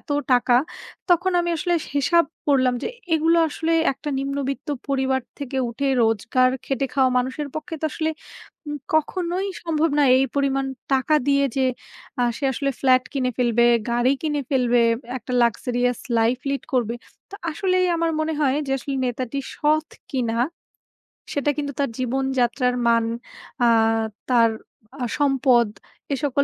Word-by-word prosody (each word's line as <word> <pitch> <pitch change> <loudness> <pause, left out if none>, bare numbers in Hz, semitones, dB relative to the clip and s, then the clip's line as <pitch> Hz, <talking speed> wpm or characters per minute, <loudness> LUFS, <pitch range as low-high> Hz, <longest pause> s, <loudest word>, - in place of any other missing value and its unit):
এত - - -19 0.2
টাকা, 245 0 +4 0.6
তখন 355 +2 +3
আমি 345 - -1
আসলে 350 +2 0
সি - - -11
হিসাব 335 +5 +4 0.2
করলাম 255 -3 +3
যে - - -1 0.3
এগুলো 325 +2 +3
আসলে 325 +2 -2 0.2
একটা 295 +3 -8
নিম্নবিত্ত 275 +1 -3 0.2
পরিবার 265 -1 +1 0.2
থেকে 275 -2 -5
উঠে 275 +4 -3 0.2
রোজগার 235 +3 +2
খেটে 270 0 -1
খাওয়া 265 -2 +3
মানুষের 260 +4 -3
পক্ষে 325 +2 -5
তো - - -3
আসলে 315 -1 -1 0.6
উম 295 - -3 0.2
কখনোই 355 +4 0 0.2
সম্ভব 325 -1 +1
না। - - +5
এই 265 - +3
পরিমাণ 275 -1 +1 0.3
টাকা 270 +4 +2
দিয়ে 280 0 +4
যে 265 - +2 0.6
আ - - +3
সে 280 - -5
আসলে 275 +2 -1
ফ্ল্যাট 255 -1 +4
কিনে 255 -3 0
ফেলবে, 240 -1 +3 0.2
গাড়ি 240 +3 +3
কিনে 295 -2 0
ফেলবে, 255 -3 +2
বে 240 -1 +5 0.4
একটা 250 - -8
লাক্সারিয়াস 245 +1 0 0.2
লাইফ 230 +3 +2
লিড 275 0 -1
করবে। 240 -2 +1 0.4
তো - - -9 0.2
আসলেই 365 +2 +1
আমার 330 0 +1
মনে 315 +1 -1
হয় 275 -1 +2
যে - - -4
আসলে 275 +2 -4
নেতাটি 250 +2 -3 0.2
সৎ 310 +1 +1 0.2
কিনা 235 -3 -1 1.0
সেটা 285 0 0
কিন্তু 285 -1 -3
তার 280 - +1
জীবনযাত্রার 255 -1 0
মান, 230 -1 +3 0.6
আ - - +5 0.6
তার 230 -2 +5 0.5
আ - - +1
সম্পদ, 260 -5 +3 0.5
এ - - +2
সকল 280 0 +2
270 Hz, 155 wpm, -23 LUFS, 250-300 Hz, 1.0 s, না